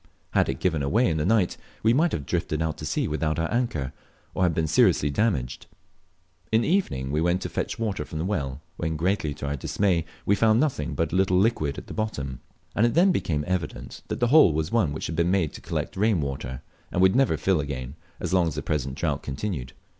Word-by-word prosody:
Had - - +2
it - - -2
given 80 -5 +1
way 120 - +3
in 80 - 0
the 75 - 0
night, 105 -4 +2 0.3
we 110 +1 +5
might 160 +5 +3
have 70 - -3
drifted 75 - -1
out 80 -1 -1
to 75 - -4
sea - - 0
without 75 0 -1
our 85 +5 -1
anchor, 100 - -1 0.4
or 90 -1 +2
been 80 0 0
seriously 75 -1 +3
damaged. 70 - -1 0.8
In 110 +1 +4
the - - -1
evening 70 - 0
we 75 +2 +1
went 85 +2 +2
to - - -3
fetch - - -3
water 105 -8 -2
from 80 - -7
the 80 - -2
well, 75 -9 -2 0.2
when, 80 -1 -2
greatly 80 -3 0
to 70 - -6
our 70 +1 -1
dismay, 85 +4 +1 0.2
we 100 - +3
found 110 +2 +4
nothing 125 - 0
but 80 -1 -1
a - - +1
little 95 -1 +3
liquid 90 -9 +1
mud - - -13
at - - -7
the - - -8
bottom, 70 - -3 0.4
and 115 +3 +4
it 120 - -2
then 185 +3 +5
became 75 - 0
evident 90 -4 -4
that - - -3
the 120 - +2
hole 145 - +7
was 80 0 -1
one 110 -10 +2
which 75 - -4
had 80 - -3
been 85 +1 +2
made 90 -5 +1
to - - -9
collect - - -3
rain 105 -1 +2
water, 65 -2 -4 0.3
and - - -1
would 95 +3 +5
never 130 -12 +3
fill 90 +4 +2
again 70 -3 -4 0.3
as - - -3
long 90 -2 +4
as 80 - -3
the 75 - -3
present 70 -4 -2
drought 75 0 -1
continued. 70 -3 -4
80 Hz, 235 wpm, -26 LUFS, 75-105 Hz, 0.8 s, hole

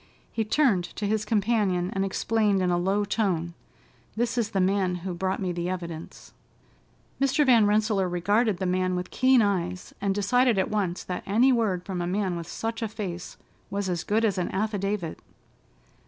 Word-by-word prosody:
He 225 - -1
turned 215 -5 +2
to 210 - -3
his 215 +1 0
companion 205 -4 +1
and 195 - 0
explained 205 +1 +1
in 180 - +1
a 175 - +2
low 195 +3 +1
tone, 185 -6 -1 0.6
"This 235 +2 0
is 235 -3 0
the 195 - -1
man 185 -1 +1
who 185 - -2
brought 185 +2 -2
me 185 -2 -1
the 175 0 -3
evidence." 170 -3 -7 0.9
Mr. 275 +2 +3
Van 235 -5 +5
Rensselaer 210 -3 +2
regarded 205 +4 +1
the 190 - -3
man 185 0 +1
with 180 0 -4
keen 255 -2 +4
eyes, 185 -3 -2
and 195 -1 0
decided 240 +3 +3
at 190 - 0
once 190 -4 -1
that 180 -1 -4
any 240 +7 +4
word 205 -7 0
from 185 -3 -3
a 175 - -2
man 190 -1 -1
with 170 -1 -6
such 225 +6 -4
a 225 - 0
face 190 -5 -6 0.3
was 200 -1 -2
as 175 -1 -2
good 220 +2 +1
as 200 -4 0
an 180 - -1
affidavit. 200 -3 -2
195 Hz, 185 wpm, -26 LUFS, 180-220 Hz, 0.9 s, Van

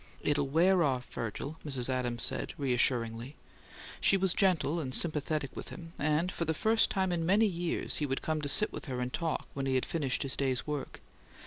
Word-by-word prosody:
"It'll 145 -1 +1
wear 175 +6 +3
off, 130 -5 +1
Virgil," 130 +7 -4
Mrs. 135 -5 +3
Adams 125 -2 0
said, - - -1
reassuringly. 125 -1 0 0.6
She 195 - +4
was 190 -2 +2
gentle 175 -4 +2
and 130 -5 -1
sympathetic 150 -3 0
with - - -6
him, 165 -1 -10
and 155 +4 +1
for - - -3
the 160 0 -1
first 220 +7 +3
time 190 -2 0
in 170 -1 -1
many 200 +6 +4
years 175 -4 -1
he 150 - -1
would 135 0 -3
come 155 -1 -1
to 145 - -1
sit 210 - +2
with - - -6
her 130 -4 -4
and 125 0 -3
talk, 165 -2 -2
when 135 -1 -3
he 130 - +1
had 130 - +1
finished 140 -6 -1
his 135 - 0
day's 130 -2 -1
work. 150 -2 -5
150 Hz, 205 wpm, -31 LUFS, 130-170 Hz, 0.6 s, She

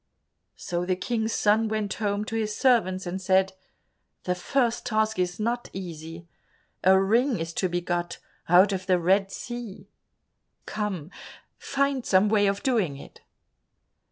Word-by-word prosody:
So 175 0 -3
the 185 +1 0
King's 220 +3 -2
son 220 +1 +2
went 215 -2 -2
home 205 -1 -2
to 225 - -5
his 215 -2 -2
servants 190 -8 +2
and 180 +2 -4
said, 190 +1 +2 0.7
"The 180 - 0
first 235 +6 0
task 220 -2 0
is 180 +1 -1
not 240 +3 -2
easy. 165 -2 -8 0.6
A 190 +1 +6
ring 230 +6 +2
is 165 0 -4
to 185 - 0
be 175 0 -1
got 175 0 -2 0.3
out 185 +4 +6
of 185 -1 -4
the 185 -1 +4
Red 195 +3 +2
Sea. 240 -5 -7 0.7
Come, 195 -6 -4 0.5
find 275 -2 0
some 195 0 +3
way 205 -1 +3
of 200 0 -1
doing 210 - +1
it." - - -13
195 Hz, 150 wpm, -26 LUFS, 180-220 Hz, 0.7 s, A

